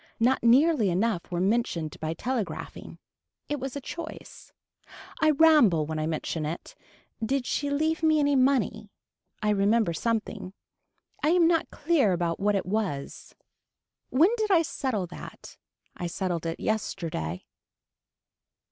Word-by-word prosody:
Not 245 +3 +3
nearly 250 - +4
enough 185 +1 0
were 175 - -1
mentioned 185 -6 -1
by 160 +1 -3
telegraphing. 240 +1 -4 0.5
It 295 -1 -2
was 270 0 -5
a - - -2
choice. 320 +4 -9 0.7
I 315 - +5
ramble 285 - +5
when 155 0 -4
I 155 - -1
mention 160 0 -3
it. 155 +3 -5 0.5
Did 265 +3 0
she 285 +3 -1
leave 315 +3 0
me 315 -1 +3
any 285 -1 +2
money. 255 -5 +1 0.5
I 210 - +2
remember 205 -1 +2
something. 215 -1 -3 0.7
I 300 - +2
am 340 0 +5
not 330 -1 +1
clear 295 - +2
about 170 -1 -1
what 205 +1 +2
it 195 - -1
was. 185 -8 -3 0.7
When 325 +10 +4
did 435 -1 -1
I 345 -4 +5
settle 255 - -2
that. 175 - -11 0.4
I 175 - -4
settled 175 -2 -3
it 165 - -4
yesterday. 160 - -3
220 Hz, 140 wpm, -27 LUFS, 175-285 Hz, 0.7 s, I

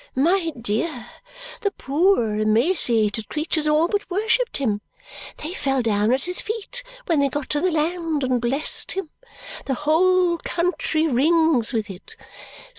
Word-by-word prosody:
My 330 +5 +2
dear, 235 +4 -2 0.6
the 405 - +1
poor 295 - +1
emaciated 220 - +1
creatures 310 0 -1
all 305 +2 +3
but 410 +2 -2
worshipped 445 +6 0
him. 215 -7 -1 0.6
They 315 +4 -6
fell 270 -7 0
down 210 0 +1
at 260 +2 +1
his 360 0 -2
feet 450 +3 -3 0.2
when 330 -4 +1
they 280 -1 +2
got 290 0 -4
to 295 - 0
the 370 - +2
land 325 -2 -1
and 255 -2 +1
blessed 270 +6 +1
him. 380 -4 -4 0.6
The 270 - 0
whole 345 +4 +2
country 340 -2 -1
rings 310 -2 +3
with 220 -4 -1
it. 185 +1 -11
305 Hz, 145 wpm, -22 LUFS, 245-350 Hz, 0.6 s, all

